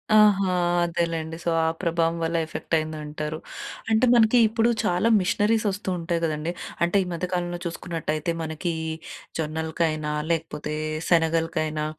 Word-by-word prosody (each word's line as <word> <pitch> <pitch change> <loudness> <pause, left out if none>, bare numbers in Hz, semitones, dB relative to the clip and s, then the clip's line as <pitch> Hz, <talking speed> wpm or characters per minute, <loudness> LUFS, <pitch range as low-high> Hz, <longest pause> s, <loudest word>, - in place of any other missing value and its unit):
ఆహా! 200 -3 +5 0.3
అదేలేండి. 165 -1 -1
సో, - - 0
ఆ - - +2 0.2
ప్రభావం 170 -1 +1
వల్ల 165 +1 -1
ఎఫెక్టయిందంటారు. 155 -1 -3 0.5
అంటే 220 +3 +4
మనకి 235 0 +5
ఇప్పుడు 225 +2 +2
చాలా 180 +5 +2
మిషనరీసొస్తూ 205 0 +1
ఉంటాయి 170 0 -1
గదండి. 155 +1 -2 0.3
అంటే 175 +4 +3
ఈ - - -7
మధ్య 170 +2 -2
కాలంలో 175 -1 -1
చూసుకున్నట్టయితే, 165 -2 -2
మనకీ 160 +2 -3 0.7
జొన్నలకైనా 160 0 -1 0.2
లేకపోతే 155 -2 -2 0.4
శనగలకైనా 165 -2 +1
165 Hz, 115 wpm, -25 LUFS, 155-180 Hz, 0.7 s, ఆహా